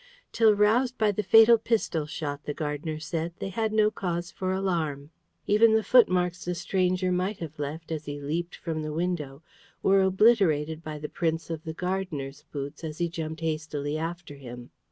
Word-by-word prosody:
Till 220 -2 +4
roused 235 +5 +3
by 215 -1 +3
the 205 - -1
fatal 225 +2 +7
pistol 210 -9 0
shot, 145 -2 -5
the 145 - -4
gardener 155 +1 -3
said, 165 +2 -3
they 195 - -4
had 220 +3 -1
no 215 0 +3
cause 175 -3 -3
for 185 0 -3
alarm. 165 -7 -2 0.3
Even 220 +2 +5
the 220 - +2
footmarks 180 -6 +3
the 180 0 -2
stranger 185 +1 0
might 185 +3 -1
have 155 -3 -8
left 155 +3 -5
as 155 -1 -4
he 145 0 -5
leaped 165 +5 -3
from 160 -2 -4
the 155 0 -4
window 160 -4 -3 0.4
were 195 0 +5
obliterated 190 -6 +3
by 155 -1 -5
the 150 0 -5
prints 165 +1 -2
of 160 0 -5
the 160 - -4
gardener's 160 -7 -4
boots 140 +2 -6
as 155 -1 -5
he 170 0 0
jumped 160 -1 -5
hastily 155 -2 -2
after 165 0 -5
him. 125 -3 -10
170 Hz, 180 wpm, -27 LUFS, 150-190 Hz, 0.4 s, fatal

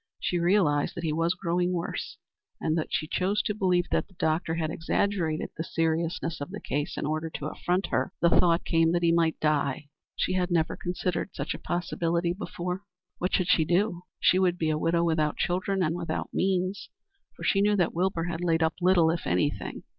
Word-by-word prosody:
She 175 - 0
realized 170 -5 +2
that 170 - -5
he 155 -2 0
was 165 +3 +1
growing 175 0 0
worse, 170 -1 -4 0.4
and 160 0 0
though 160 - 0
she 155 - -1
chose 200 +6 0
to 210 - -1
believe 180 -4 +2
that - - +1
the 190 - -23
doctor 160 0 0
had 160 -1 -1
exaggerated 165 -1 -1
the 160 - -3
seriousness 165 0 -1
of 145 - -4
the 210 +2 -6
case 145 +1 -3
in - - -2
order 155 +2 -2
to 150 - -6
affront 180 +5 -1
her, - - 0
the 170 - +4
thought 170 -1 +3
came 165 0 +3
that 175 0 +1
he 170 - +4
might 165 -1 +2
die. 145 -2 0 0.3
She 185 - 0
had 185 -1 0
never 165 -2 +1
considered 175 0 -2
such 140 - -3
a - - -7
possibility 170 0 -1
before. 180 -1 -4 0.4
What 180 - +1
should 185 - +1
she 165 - +5
do? 175 +2 +1 0.2
She 185 - +4
would 180 -2 +2
be 160 -3 0
a 155 - 0
widow 170 +1 +2
without 160 -3 +1
children 185 +2 0
and 165 0 0
without 170 -2 -3
means, 190 +1 0 0.5
for - - -10
she 195 - +3
knew 205 +1 +3
that 180 -4 +1
Wilbur 175 -1 0
had 175 0 -3
laid 165 -2 +2
up 160 - +2
little 175 -3 +5
if 170 - -3
anything. 90 +1 -1
170 Hz, 205 wpm, -27 LUFS, 160-180 Hz, 0.5 s, she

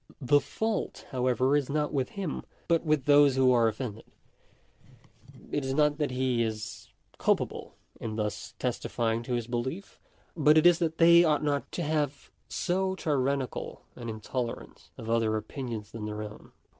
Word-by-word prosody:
The 145 +1 +4
fault, 220 +8 -3
however, 130 +1 +2
is 145 -2 0
not 150 +1 -1
with 135 -3 0
him, 190 -7 -3 0.3
but 165 -1 +2
with 155 -4 +1
those 145 -2 +6
who 130 -1 +4
are 120 -2 +4
offended. 110 -1 -4 1.5
It 145 - -1
is 135 0 -2
not 150 0 +2
that 150 - +1
he 125 -2 0
is 110 -1 -4 0.3
culpable - - 0 0.2
in 110 -1 -4
thus 105 -1 -4
testi - - -2
fying 115 -1 0
to 125 - -3
his 120 -2 -1
belief, 125 - -4 0.4
but 155 -1 +5
it 155 - +5
is 175 -1 +6
that 165 -2 -1
they 170 +1 +7
ought 155 -2 +2
not 145 -1 -1
to 175 - -2
have 145 -2 -2 0.2
so 190 +1 0
tyrannical 140 -5 -2
an 120 -1 -6
intolerance 115 +2 -5
of 110 - -8
other 115 -1 +1
opinions 110 -1 -6
than 110 -2 -6
their 105 0 -4
own. 105 0 -10
135 Hz, 165 wpm, -29 LUFS, 115-150 Hz, 1.5 s, they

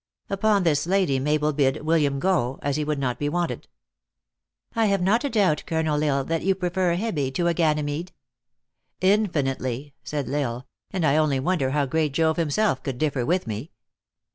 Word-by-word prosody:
Upon 200 0 +2
this 160 -2 +1
Lady 180 -8 +2
Mabel 150 +2 +1
bid 140 0 +1
Wil 165 +1 +3
liam 140 -2 +1
go, 135 -6 0
as 145 -1 0
he 150 - 0
would 150 0 -1
not 130 -3 -2
be 145 - 0
wanted." 175 +2 -2 1.1
"I 225 -1 +3
have 200 -1 +2
not 215 +7 +2
a 285 - 0
doubt, 200 - +2
Colonel 160 -2 0
L 150 - +2
Isle, 135 - 0
that 165 +3 -2
you 190 +1 +2
prefer 180 0 0
a - - -1
Hebe 170 -11 -1
to 175 - 0
a 170 - +3
Ganymede." 155 +1 0 0.5
" - - -52
Infinitely," 140 - -2
said 145 -4 -3
L 130 - -4
Isle; 125 -3 -2
" - - -61
and 180 -4 -1
I 150 0 +3
only 150 -4 +2
wonder 140 -2 0
how 145 +1 +1
great 150 +1 0
Jove 160 +1 +2
himself 165 0 +1
could 135 -3 -4
differ 140 -4 -1
with 180 +2 +1
me." 110 +7 -5
155 Hz, 200 wpm, -24 LUFS, 140-180 Hz, 1.1 s, Wil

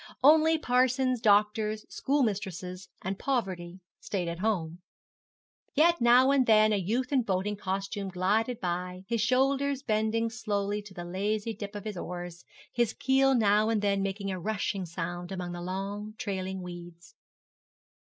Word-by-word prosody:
Only 315 +3 +6
parsons, 255 -2 +2
doctors, 215 0 +2
schoolmistresses, 190 - -2
and 190 +1 -3
poverty 185 -9 -2 0.2
stayed 185 -4 -3
at 170 0 -4
home. 180 -5 -1 1.0
Yet 335 +1 +4
now 245 +3 +6
and 270 -3 +3
then 215 -1 +5
a - - +2
youth 230 +8 -1
in 265 - +4
boating 200 -1 -1
costume 195 +1 -3
glided 210 +6 0
by, 180 0 -3
his 230 -1 0
shoulders 275 +3 +1
bending 220 0 0
slowly 210 -3 -2
to 205 -2 -14
the 175 -1 -6
lazy 205 +5 -2
dip 205 0 -7
of 205 - -6
his 210 -3 -4
oars, 175 0 -6 0.3
his 235 -2 +1
keel 270 0 +3
now 215 -1 +3
and 215 -2 0
then 200 -1 +2
making 195 0 -2
a 185 - -4
rushing 200 -1 -2
sound 175 +2 -5
among 180 -2 -4
long 195 +4 -5
trailing 190 -2 -4
weeds. 175 - -10
205 Hz, 145 wpm, -29 LUFS, 185-235 Hz, 1.0 s, Only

